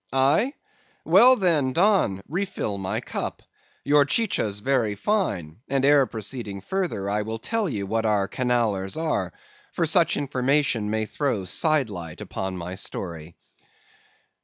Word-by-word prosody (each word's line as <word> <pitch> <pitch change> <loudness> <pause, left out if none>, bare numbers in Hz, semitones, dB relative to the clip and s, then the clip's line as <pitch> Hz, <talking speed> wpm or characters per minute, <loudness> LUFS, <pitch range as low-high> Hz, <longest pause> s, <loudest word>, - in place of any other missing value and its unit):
"'Aye? 140 - +2 0.5
Well 230 +10 +7
then, 160 - +1
Don, 175 - +2
refill 170 - -3
my 95 -1 -2
cup. - - -5 0.4
Your 145 0 +5
chicha's 140 - 0
very 115 -3 +1
fine; 100 - -1
and 135 -1 +1
ere 140 -2 +5
proceeding 110 -2 -5
further 175 - -2
I 105 +1 0
will 110 +1 -4
tell 220 - -1
ye 105 -7 -3
what 110 +3 -1
our 105 -3 +1
Canallers 110 -5 -1
are; 160 -1 -1 0.4
for 170 - +1
such 165 +1 +3
information 135 -4 0
may 110 0 0
throw 115 -5 -2
side 145 - +1
light 85 -5 -7
upon 95 -1 -4
my 90 +1 -6
story. 85 -4 -6
125 Hz, 135 wpm, -24 LUFS, 100-155 Hz, 0.5 s, Well